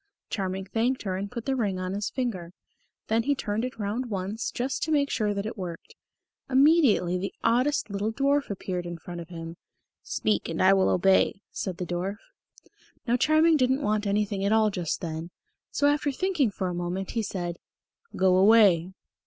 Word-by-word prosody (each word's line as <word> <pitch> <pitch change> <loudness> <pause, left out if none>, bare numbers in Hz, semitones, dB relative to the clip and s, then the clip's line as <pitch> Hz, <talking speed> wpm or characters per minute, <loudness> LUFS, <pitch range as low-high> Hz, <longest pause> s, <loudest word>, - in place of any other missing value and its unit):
Charming 190 -1 -2
thanked 235 +6 -1
her 190 -3 -2
and 200 +2 -4
put 235 0 -6
the 270 - 0
ring 205 -7 -1
on 185 0 -3
his 205 +1 -2
finger. 190 -10 -3 0.5
Then 225 +1 +1
he 285 +4 +1
turned 215 -3 -2
it 255 -2 -4
round 220 +4 -2
once 200 +3 -3
just 255 +2 -3
to 315 - -1
make 285 -2 +2
sure 215 -3 0
that 200 0 -3
it 220 - -4
worked. 175 -3 -7 0.6
Immediately 265 - +4
the 195 - -4
oddest 250 -1 +1
little 205 +2 -1
dwarf 280 +3 +1
appeared 180 -3 -4
in 175 0 -5
front 175 +1 -8
of 165 - -11
him. 165 -1 -8 0.4
"Speak 105 -1 -1
and 165 - -3
I 190 +1 +6
will 190 -1 +3
obey," 195 +2 +3
said 185 -3 -4
the 180 - -3
dwarf. 180 +4 -3 0.9
Now 240 -1 +2
Charming 310 +4 +4
didn't 260 +1 +1
want 210 -3 0
anything 200 -1 0
at 200 - +1
all 220 -1 +4
just 175 -4 -3
then, 165 0 -5 0.4
so 285 - 0
after 290 0 +2
thinking 315 - +1
for 195 -2 -3
a 180 - -3
moment, 175 +2 -3
he 230 - -1
said, 175 -4 -4 0.6
"Go 185 -1 +4
away!" 190 -4 +5
205 Hz, 185 wpm, -27 LUFS, 185-250 Hz, 0.9 s, I